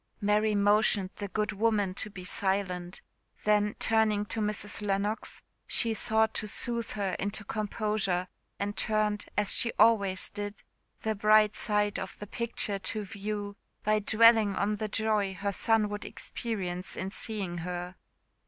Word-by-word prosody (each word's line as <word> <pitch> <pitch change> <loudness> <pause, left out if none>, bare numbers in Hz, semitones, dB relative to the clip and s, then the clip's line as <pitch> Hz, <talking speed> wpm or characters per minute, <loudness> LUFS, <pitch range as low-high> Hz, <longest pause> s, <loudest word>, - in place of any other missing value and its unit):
Mary 210 0 +2
motioned 205 -1 +3
the 205 - -4
good 210 +2 -1
woman 210 -2 +1
to 210 - -4
be 185 -3 -9
silent; 185 -2 -2 0.4
then 210 0 +2
turning 220 -2 +2
to 225 - -4
Mrs 210 0 -2
Lennox, 205 +1 -2 0.2
she 230 -2 0
sought 220 +1 +2
to 215 - -3
sooth 235 +2 -2
her 195 -3 -1
into 205 +2 -2
composure, 210 -3 -1 0.3
and 205 +1 -3
turned, 210 -1 0
as 205 -1 +3
she 230 - +3
always 200 -5 +4
did, 205 0 -6 0.4
he 220 - +1
bright 215 0 +4
side 210 -1 0
of 190 - -6
the 210 - -7
picture 220 -2 -2
to 215 +2 -3
view, 205 +1 -4 0.3
by 215 0 +3
dwelling 220 -1 +5
on 210 +1 0
the 215 - -2
joy 210 -2 0
her 200 +2 -2
son 220 +1 +2
would 205 0 -5
experience 185 -6 -4
in 190 +1 -3
seeing 195 -6 -3
her. 180 +1 -5
210 Hz, 150 wpm, -29 LUFS, 200-215 Hz, 0.4 s, dwelling